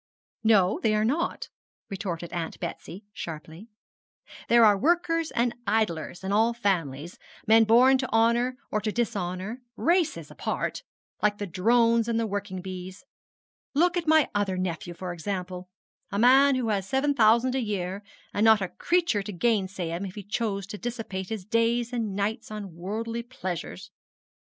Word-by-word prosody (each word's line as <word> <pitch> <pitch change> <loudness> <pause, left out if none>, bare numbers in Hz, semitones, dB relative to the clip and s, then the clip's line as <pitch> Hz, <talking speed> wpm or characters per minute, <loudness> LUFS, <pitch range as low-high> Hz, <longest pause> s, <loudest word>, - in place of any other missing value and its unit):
'No, 205 -4 +4
they 215 -2 +2
are 215 0 +2
not,' 300 +9 -1 0.4
retorted 175 -3 -5
Aunt 170 -2 -4
Betsy, 180 +3 -7
sharply. 160 +5 -8 0.8
'There 235 -1 +7
are 210 -1 +6
workers 330 - +1
and 235 0 0
idlers 195 -6 -1
in 190 - -3
all 225 +3 +3
families 170 - -2 0.3
men 225 0 +6
born 255 +4 +6
to 260 - -3
honour 235 +3 +2
or 215 - 0
to 215 +1 -1
dishonour 205 0 -3
races 340 +4 +1
apart - - -3 0.4
like 210 0 +2
the 205 - -3
drones 230 +5 +3
and 230 -1 0
the 230 - 0
working 200 -3 -4
bees. 185 +5 -8 0.7
Look 350 +4 +3
at 345 -2 -2
my 315 -2 +5
other 200 -2 0
nephew, 175 -1 -3
for 180 0 -5
example 180 0 -5 0.4
a 200 - -2
man 265 +5 +6
who 245 -3 -1
has 195 -2 -1
seven 280 +2 +2
thousand 235 +1 +4
a 265 - 0
year, 195 -3 -3 0.3
and 205 - +1
not 220 -1 +6
a 190 -2 -3
creature 340 - +1
to 195 - -6
gainsay 190 -3 0
him 170 +3 -3
if 190 -2 -6
he 205 - -7
chose 205 -1 -2
to 210 +1 -8
dissipate 225 -6 -5
his 215 -5 -5
days 230 +2 +1
and 220 -5 -2
nights 205 +2 -2
on 210 -4 -7
worldly 225 +6 -4
pleasures. 185 - -6
215 Hz, 160 wpm, -27 LUFS, 185-235 Hz, 0.8 s, There